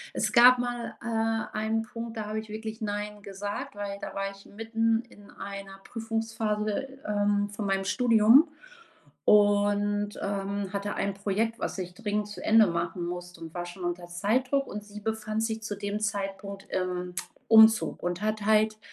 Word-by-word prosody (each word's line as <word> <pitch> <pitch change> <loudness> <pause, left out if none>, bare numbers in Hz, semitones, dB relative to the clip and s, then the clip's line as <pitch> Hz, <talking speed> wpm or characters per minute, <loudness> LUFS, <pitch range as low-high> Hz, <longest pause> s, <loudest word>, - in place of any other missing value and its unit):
es - - 0
gab 250 +1 +9
mal, 245 -1 -3
äh, 225 -1 -1
einen 220 +1 0
Punkt, 230 0 -7
da 215 - -3
habe 215 +1 -3
ich 220 -1 -9
wirklich 220 +1 -6
Nein 210 0 -3
gesagt, 200 +1 -5
weil 200 -1 -5
da - - -6
war 195 0 -2
ich 195 0 -15
mitten 225 +1 0
in 205 -1 -16
einer 195 -1 -8
Prüfungsphase, 225 +2 -2
ähm, 205 0 +1
von 205 0 -4
meinem 195 0 0
Studium, 235 - +6 0.8
und, 205 0 +3
ähm, 200 0 -2
hatte 200 +1 -2
ein 200 0 -1
Projekt, 210 +4 -1
was - - -3
ich 180 -1 -5
dringend 210 0 -2
zu 205 - -8
Ende 220 0 +6
machen 170 +1 -2
musste 175 0 -6
und 165 -1 -8
war 175 -1 -4
schon 175 +1 -9
unter 175 0 -3
Zeitdruck. 255 +10 +1
Und 210 0 -6
sie 210 0 -10
befand 220 0 -2
sich 220 0 -2
zu 205 -2 -4
dem 205 +1 -3
Zeitpunkt 200 -1 -3
im 180 -1 -2 0.4
Umzug 220 0 +6
und 175 +2 -2
hat 215 -1 -1
halt 215 0 +3
210 Hz, 170 wpm, -28 LUFS, 195-225 Hz, 0.8 s, gab